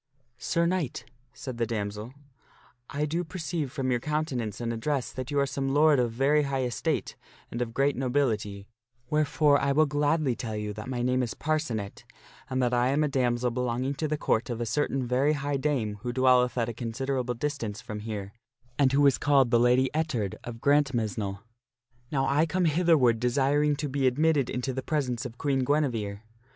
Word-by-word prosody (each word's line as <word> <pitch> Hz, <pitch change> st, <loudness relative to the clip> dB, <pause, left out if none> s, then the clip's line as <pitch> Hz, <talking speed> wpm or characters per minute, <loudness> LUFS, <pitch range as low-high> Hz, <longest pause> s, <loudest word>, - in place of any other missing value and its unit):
" 120 Hz, 0 st, -45 dB
Sir 170 Hz, +5 st, +1 dB
Knight," 170 Hz, -10 st, -1 dB, 0.3 s
said 130 Hz, -3 st, -7 dB
the 115 Hz, -, +1 dB
damsel, 105 Hz, 0 st, -4 dB, 0.4 s
" -, -, -29 dB, 0.3 s
I 145 Hz, +2 st, -1 dB
do 165 Hz, +4 st, -1 dB
perceive 160 Hz, -5 st, -4 dB
from 130 Hz, -1 st, -2 dB
your 120 Hz, -, +1 dB
countenance 135 Hz, -6 st, -2 dB
and 115 Hz, -1 st, -2 dB
address 130 Hz, +3 st, -2 dB
that 130 Hz, -1 st, -6 dB
you 145 Hz, -, -2 dB
are 140 Hz, -, +3 dB
some 135 Hz, 0 st, -2 dB
lord 150 Hz, -2 st, +5 dB
of 120 Hz, -2 st, +1 dB
very 140 Hz, +6 st, +3 dB
high 135 Hz, -2 st, -1 dB
estate 120 Hz, -5 st, -2 dB, 0.4 s
and 120 Hz, -, -4 dB
of 115 Hz, -2 st, -3 dB
great 140 Hz, +1 st, +2 dB
nobility, 115 Hz, -7 st, -1 dB, 0.5 s
wherefore 150 Hz, -1 st, +3 dB
I 140 Hz, 0 st, +2 dB
will 155 Hz, +2 st, +4 dB
gladly 145 Hz, -2 st, +1 dB
tell 115 Hz, -2 st, -5 dB
to 105 Hz, -, -3 dB
you 105 Hz, 0 st, -4 dB
that 105 Hz, +4 st, -7 dB
my 125 Hz, -2 st, -2 dB
name 125 Hz, +1 st, +2 dB
is 120 Hz, -3 st, -3 dB
Parcenet, 120 Hz, -10 st, -2 dB, 0.5 s
and 130 Hz, -1 st, 0 dB
that 125 Hz, 0 st, +1 dB
I 120 Hz, 0 st, +3 dB
am 140 Hz, +3 st, +2 dB
a -, -, +2 dB
damsel 125 Hz, -3 st, 0 dB
belonging 125 Hz, +2 st, -1 dB
to 155 Hz, +3 st, -2 dB
the 155 Hz, 0 st, -1 dB
Court 115 Hz, -3 st, 0 dB
of 120 Hz, -1 st, -3 dB
a 120 Hz, -, -1 dB
certain 135 Hz, +2 st, 0 dB
very 130 Hz, +5 st, +2 dB
high 145 Hz, -1 st, -1 dB
dame 125 Hz, -8 st, -1 dB
who 120 Hz, -, -3 dB
dwelleth 125 Hz, 0 st, +3 dB
at 115 Hz, -2 st, +1 dB
a 120 Hz, -, -4 dB
considerable 125 Hz, +2 st, -2 dB
distance 120 Hz, -5 st, -3 dB
from 110 Hz, -4 st, -7 dB
here, 105 Hz, -2 st, -6 dB, 0.5 s
and 135 Hz, -2 st, +4 dB
who 145 Hz, +1 st, +4 dB
is 140 Hz, -, +4 dB
called 135 Hz, -4 st, +3 dB
the 120 Hz, -, +5 dB
Lady 125 Hz, +2 st, +4 dB
Ettard 150 Hz, -, -1 dB
of 115 Hz, -1 st, -8 dB
Grantmesnle. 115 Hz, -9 st, +1 dB, 0.7 s
Now 135 Hz, -3 st, +1 dB
I 145 Hz, +4 st, +2 dB
come 185 Hz, +1 st, 0 dB
hitherward 155 Hz, -8 st, +3 dB
desiring 140 Hz, +4 st, +2 dB
to 145 Hz, +1 st, -3 dB
be 135 Hz, -1 st, +1 dB
admitted 145 Hz, +1 st, +2 dB
into 125 Hz, +1 st, -2 dB
the 130 Hz, -, -3 dB
presence 130 Hz, -3 st, -2 dB
of 120 Hz, 0 st, -14 dB
Queen 140 Hz, 0 st, 0 dB
Guinevere. 120 Hz, -8 st, 0 dB
130 Hz, 195 wpm, -27 LUFS, 120-145 Hz, 0.7 s, lord